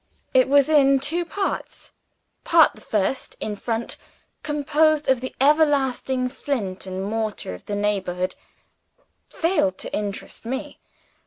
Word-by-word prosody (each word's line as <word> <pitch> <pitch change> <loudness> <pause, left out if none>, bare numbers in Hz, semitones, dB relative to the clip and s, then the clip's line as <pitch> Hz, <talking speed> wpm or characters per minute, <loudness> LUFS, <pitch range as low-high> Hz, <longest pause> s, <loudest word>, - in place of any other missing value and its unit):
It 260 0 +4
was 280 -1 +5
in 275 -3 +5
Two 320 +6 0
Parts. 395 +3 -4 0.5
Part 330 -2 +5
the - - -16
First, 215 +5 -1
in 210 - -3
front, 230 +2 -3 0.4
composed 300 +1 +2
of 265 -2 +3
the 260 - -6
everlasting 270 -3 +2
flint 230 -9 -4
and 190 0 -4
mortar 215 - -3
of 90 - -12
the 205 - -2
neighborhood, 190 -3 -1 1.0
failed 325 - +1
to - - -7
interest 205 -1 -5
me. 260 +4 -5
260 Hz, 130 wpm, -23 LUFS, 205-290 Hz, 1.0 s, was